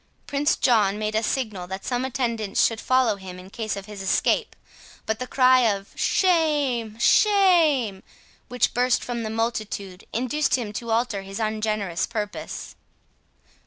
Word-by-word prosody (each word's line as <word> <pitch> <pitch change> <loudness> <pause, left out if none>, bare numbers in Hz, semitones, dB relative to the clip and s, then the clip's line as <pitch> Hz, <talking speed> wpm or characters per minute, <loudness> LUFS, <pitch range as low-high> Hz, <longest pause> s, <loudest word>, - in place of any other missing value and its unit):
Prince 290 +2 +1
John 210 -5 +2
made 215 0 -2
a 220 - +1
signal 215 -7 -2
that 190 +1 -6
some 245 0 -1
attendants 235 -6 0
should 225 -2 -1
follow 255 -5 +2
him 185 -2 -9
in 185 +1 -12
case 220 -2 -3
of 200 -1 -7
his 210 -1 -9
escape: 190 - +1 0.5
but 220 0 -2
the 255 - -4
cry 255 0 +5
of 200 -5 0
"Shame! 290 - +1
shame!" 320 - +4 0.5
which 250 -2 0
burst 250 0 +2
from 240 -1 -4
the 220 - -3
multitude, 215 -4 -3
induced 255 +5 0
him 225 -5 -4
to 235 +2 -5
alter 225 -3 0
his 195 +2 -7
ungenerous 215 -4 -1
purpose. 210 -3 -5
225 Hz, 150 wpm, -24 LUFS, 205-255 Hz, 0.5 s, cry